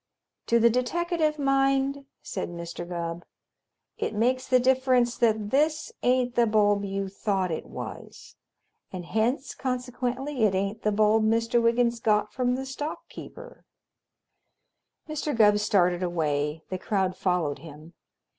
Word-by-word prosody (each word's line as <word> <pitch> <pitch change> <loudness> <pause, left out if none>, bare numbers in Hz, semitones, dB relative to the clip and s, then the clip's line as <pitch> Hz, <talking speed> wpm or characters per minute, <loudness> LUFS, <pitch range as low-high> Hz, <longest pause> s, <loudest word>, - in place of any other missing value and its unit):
"To 235 - +4
the 235 +1 +5
deteckative 310 +5 0
mind," 275 0 +1 0.2
said 185 - -4
Mr. 170 0 -7
Gubb, 170 -1 -4 0.8
"it - - -2
makes 255 +4 +1
the 255 -1 +4
difference 255 -1 +2
that 215 -3 +1
this 305 +8 +1
ain't 250 0 +2
the 240 -1 +3
bulb 205 -1 +3
you 195 0 -3
thought 190 -2 -1
it 160 - -4
was, - - -9 0.6
and 180 -2 -6
hence 235 +9 -1
consequently 255 +1 -3
it 195 -3 +2
ain't 200 +3 -2
the 210 - +1
bulb 215 +1 +3
Mister 230 +2 +2
Wiggins 235 0 +2
got 210 -1 +1
from 250 -1 0
the 265 +1 -4
stock 290 +3 -6
keeper." - - -11 1.4
Mr. 305 -3 -3
Gubb 210 -2 +5
started 180 -4 +2
away. 155 -3 -1
The 185 - -4
crowd 190 -3 -1
followed 180 -7 -1
him. 155 +2 -12
225 Hz, 135 wpm, -26 LUFS, 190-255 Hz, 1.4 s, the